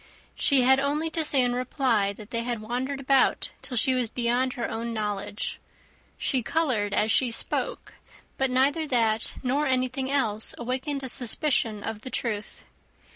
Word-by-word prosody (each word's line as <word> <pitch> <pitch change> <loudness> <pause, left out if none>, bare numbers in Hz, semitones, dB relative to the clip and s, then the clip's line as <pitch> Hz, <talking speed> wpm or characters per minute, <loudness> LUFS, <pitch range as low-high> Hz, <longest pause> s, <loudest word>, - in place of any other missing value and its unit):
She 275 -3 +3
had 265 +1 +5
only 295 +4 0
to 320 0 +2
say 280 -4 +2
in 245 0 +1
reply, 245 -5 +1
that 210 +2 -13
they 230 - -1
had 235 -1 -2
wandered 250 +5 -3
about 270 -1 +2
till 250 - -4
she 260 +4 +4
was 250 -3 0
beyond 245 +2 0
her 240 -3 -3
own 230 +1 -4
knowledge. 210 -1 -3 0.6
She 260 - 0
coloured 240 -7 0
as 215 +2 +2
she 255 - +3
spoke; - - -2 0.4
but 265 0 +1
neither 280 +5 +2
that, 225 -4 +1
nor 280 +4 +1
anything 260 +1 0
else, 220 -6 +1
awakened 260 +3 -3
a - - -2
suspicion 240 -4 0
of 220 -1 -4
the 260 - -7
truth. 215 -5 -3
250 Hz, 165 wpm, -26 LUFS, 225-270 Hz, 0.6 s, had